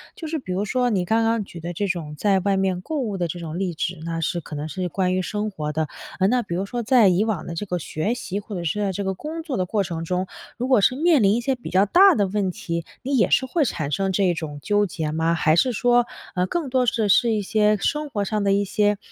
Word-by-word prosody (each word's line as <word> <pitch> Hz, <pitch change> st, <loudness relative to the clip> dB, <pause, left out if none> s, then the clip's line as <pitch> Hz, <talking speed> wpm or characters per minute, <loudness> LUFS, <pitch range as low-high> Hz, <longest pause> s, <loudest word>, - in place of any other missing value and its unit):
就 320 Hz, -, -7 dB
是 320 Hz, 0 st, -2 dB
比 185 Hz, -10 st, -7 dB
如 195 Hz, +3 st, 0 dB
说 250 Hz, +1 st, +1 dB
你 185 Hz, -3 st, 0 dB
刚 225 Hz, +4 st, +2 dB
刚 225 Hz, -1 st, +1 dB
举 175 Hz, -3 st, -11 dB
的 170 Hz, +2 st, -5 dB
这 200 Hz, +4 st, -1 dB
种 160 Hz, -5 st, -3 dB
在 195 Hz, +2 st, +2 dB
外 195 Hz, +1 st, +1 dB
面 190 Hz, -2 st, 0 dB
购 310 Hz, +9 st, -4 dB
物 210 Hz, -6 st, -2 dB
的 175 Hz, -1 st, -1 dB
这 175 Hz, +2 st, -6 dB
种 165 Hz, 0 st, -5 dB
例 185 Hz, -3 st, -1 dB
子， 170 Hz, +1 st, -3 dB
那 165 Hz, 0 st, -3 dB
是 170 Hz, +2 st, -1 dB
可 155 Hz, -1 st, -8 dB
能 150 Hz, +2 st, -4 dB
是 180 Hz, +5 st, -3 dB
关 185 Hz, +1 st, 0 dB
于 185 Hz, -, +1 dB
生 210 Hz, +2 st, -2 dB
活 150 Hz, -6 st, -4 dB
的。 160 Hz, 0 st, -1 dB, 0.3 s
呃， 190 Hz, -, +4 dB
那 245 Hz, +1 st, +2 dB
比 205 Hz, -, -6 dB
如 190 Hz, +2 st, -1 dB
说 240 Hz, +2 st, -4 dB
在 240 Hz, -3 st, +5 dB
以 185 Hz, +3 st, +3 dB
往 215 Hz, -7 st, -2 dB
的 170 Hz, -, -5 dB
这 205 Hz, -, -3 dB
个 180 Hz, -2 st, -2 dB
学 160 Hz, +9 st, -2 dB
习， 200 Hz, -5 st, -4 dB
或 205 Hz, 0 st, -8 dB
者 175 Hz, -, -4 dB
是 190 Hz, +5 st, -1 dB
在 200 Hz, -2 st, 0 dB
这 200 Hz, +2 st, -3 dB
个 190 Hz, 0 st, -1 dB
工 315 Hz, -, -6 dB
作 295 Hz, -6 st, -4 dB
的 185 Hz, -, 0 dB
过 205 Hz, +1 st, 0 dB
程 165 Hz, -2 st, -4 dB
中， 185 Hz, +2 st, -1 dB, 0.3 s
如 250 Hz, +1 st, -2 dB
果 255 Hz, -6 st, +4 dB
是 255 Hz, -, +3 dB
面 310 Hz, -5 st, +4 dB
临 200 Hz, +1 st, +5 dB
一 240 Hz, -, 0 dB
些 265 Hz, +2 st, 0 dB
比 240 Hz, -, -8 dB
较 190 Hz, +3 st, +4 dB
大 385 Hz, -, +7 dB
的 200 Hz, -3 st, +2 dB
问 195 Hz, -1 st, -1 dB
题， 170 Hz, -1 st, -4 dB, 0.2 s
你 270 Hz, +1 st, 0 dB
也 205 Hz, -, +3 dB
是 260 Hz, -, +4 dB
会 300 Hz, +1 st, +1 dB
产 150 Hz, -9 st, -3 dB
生 195 Hz, +4 st, 0 dB
这 185 Hz, -1 st, +2 dB
种 150 Hz, -3 st, -6 dB
纠 205 Hz, +3 st, +2 dB
结 160 Hz, -4 st, -3 dB
吗？ 160 Hz, +2 st, +1 dB
还 160 Hz, -2 st, +3 dB
是 250 Hz, +9 st, +3 dB
说， 245 Hz, +1 st, +3 dB, 0.3 s
呃， 180 Hz, 0 st, +2 dB
更 315 Hz, -, -2 dB
多 255 Hz, -1 st, +2 dB
的 220 Hz, -3 st, +1 dB
是 235 Hz, +3 st, +4 dB
一 210 Hz, -, 0 dB
些 210 Hz, +1 st, +2 dB
生 300 Hz, +7 st, -1 dB
活 205 Hz, -5 st, -1 dB
上 210 Hz, 0 st, -1 dB
的 200 Hz, -, +2 dB
一 200 Hz, +1 st, +2 dB
些， 205 Hz, +1 st, +1 dB
200 Hz, 305 characters per minute, -23 LUFS, 175-230 Hz, 0.3 s, 大